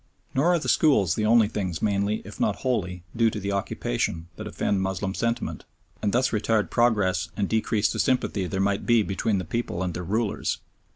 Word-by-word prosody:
Nor 135 +5 +2
are - - +3
the 160 - -4
schools 105 - +4
the 105 +1 0
only 115 -1 +5
things 95 -6 -3
mainly, 100 +1 0
if 100 - -10
not 105 - +1
wholly, 90 -8 -1
due 115 -1 +4
to 105 - -5
the 100 0 -3
occupation 85 -3 -2
that 110 +2 -7
offend 100 -2 0
Moslem 95 0 -2
sentiment, 115 +2 -2 0.4
and 105 - +1
thus 125 +3 +2
retard 110 0 +1
progress 100 -7 +2
and 100 -2 0
decrease 110 0 +1
the - - -4
sympathy 115 -7 +1
there 95 +1 -3
might 100 0 0
be 120 -2 +5
between 100 +2 0
the 90 - -3
people 95 -3 -2
and 90 -2 -2
their 90 - -4
rulers. 105 +4 -1
105 Hz, 195 wpm, -25 LUFS, 95-115 Hz, 0.4 s, only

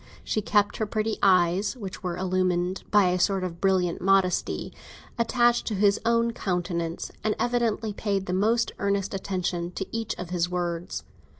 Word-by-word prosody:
She 215 - -1
kept 205 0 +2
her 220 - -1
pretty 215 +1 -1
eyes, 185 +4 +3
which 195 -5 -7
were 180 -2 -3
illumined 185 0 0
by 205 -3 +5
a 180 0 0
sort 195 0 +2
of 170 -2 -5
brilliant 185 -3 +1
modesty, 190 -1 +1 0.5
attached 240 +1 +2
to 215 - -1
his 200 +1 +3
own 230 0 +2
countenance, 175 -4 -2
and 215 - +1
evidently 230 -3 0
paid 200 -2 -1
the 180 - -3
most 225 +5 +2
earnest 200 -1 0
attention 180 -3 -2
to 195 - -3
each 225 -1 -2
of 180 -1 -7
his 175 -1 0
words. 175 -1 -3
195 Hz, 165 wpm, -26 LUFS, 180-215 Hz, 0.5 s, by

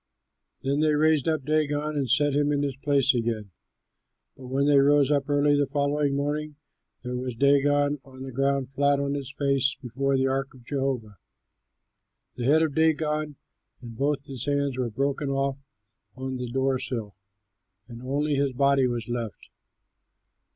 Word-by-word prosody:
Then 140 +2 0
they 155 -1 +3
raised 155 -1 +2
up 155 -4 0
Dagon 150 0 0
and 135 -3 -1
set 145 +3 +3
him 145 +1 +2
in 145 0 0
his 140 -2 -2
place 140 0 +2
again. 115 -4 -2 0.8
But 130 - -11
when 135 +2 0
they 145 -1 +5
rose 145 0 +4
early 145 0 +2
on 145 - +2
the 145 - +1
following 145 0 0
morning, 150 +1 -2 0.5
there 125 0 -4
was 125 -1 -4
Dagon 145 +2 +3
on 130 -1 -11
the 135 - -7
ground 135 0 0
flat 140 0 +2
on 140 0 -1
his 140 -2 -4
face 140 -1 +1
before 135 +2 -1
the 130 - +1
ark 135 0 -2
of 125 -2 -17
Jehovah. 130 - -3 1.1
The 120 - -5
head 155 +4 +4
of 155 -3 -1
Dagon 155 -1 +1 0.4
and 115 -2 -10
both 140 +2 -1
his 130 -1 -5
hands 140 -2 0
were 125 -2 -2
broken 140 +5 -1
off 135 0 -1 0.6
on 130 0 -4
the 125 0 -4
door 130 +1 0
sill, 110 -7 -3 0.7
and 120 -1 -10
only 145 +4 -1
his 140 -1 0
body 140 0 +3
was 120 -2 -3
left. 120 -5 -5
140 Hz, 165 wpm, -26 LUFS, 130-145 Hz, 1.1 s, they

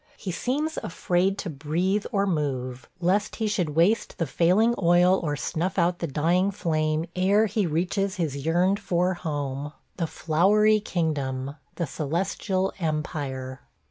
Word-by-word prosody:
He 190 - -4
seems 290 - -1
afraid 180 +3 0
to 200 - -4
breath 170 +8 -1
or 200 -1 +2
move, 130 -7 -2
lest 195 +4 +1
he 220 - -2
should 180 -8 -1
waste 185 +8 +2
the 165 - 0
failing 185 - +3
oil 180 +2 +5
or 150 -3 -1
snuff 175 +6 -2
out 175 0 +2
the 170 - -2
dying 170 +7 +2
flame 155 -4 0
ere 200 +4 +3
he 210 -2 0
reaches 185 +5 0
his 145 -6 -2
yearned 180 +5 +2
for 180 +1 +1
home 145 -4 -4
– - - -42
the 170 -2 -1
Flowery 205 +8 +3
Kingdom 140 -8 -2
– - - -40
the 170 - -1
Celestial 185 +6 -1
Empire! 140 -5 -3
175 Hz, 150 wpm, -26 LUFS, 150-195 Hz, -, oil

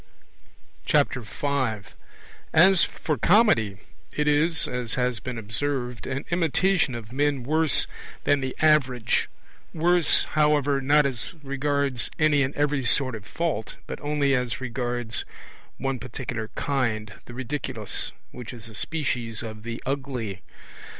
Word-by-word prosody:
5 125 -1 0 0.6
As 185 +3 +6
for 150 -6 -2
Comedy, 120 - +4 0.4
it 150 0 0
is 150 +3 +4
(as 125 -2 -1
has 125 -2 0
been 125 +3 -5
observed) 125 +3 -3
an 135 +1 -3
imitation 175 -3 +2
of 115 -1 -8
men 140 -1 0
worse 155 +3 +4 0.4
than 145 -1 +2
the 130 0 -3
average; 135 -6 +3 0.5
worse, 170 0 +4
however, 145 -2 +2
not 145 +2 +4
as 135 +5 -1
regards 140 -2 0
any 155 -2 +4
and 135 +1 -1
every 145 -1 +1
sort 130 +2 +3
of 105 -3 -8
fault, 155 -10 -3
but - - -7
only 145 -1 +1
as 125 -2 0
regards 120 -2 -2 0.5
one 135 -1 -2
particular 115 -2 -5
kind, 115 -7 -1
the 120 - -10
Ridiculous, 130 -4 -3 0.2
which 125 0 -8
is 115 -2 -9
a - - -12
species 120 -6 -2
of 110 -1 -7
the 115 +1 -5
Ugly. 130 -8 -3
130 Hz, 130 wpm, -25 LUFS, 120-145 Hz, 0.6 s, As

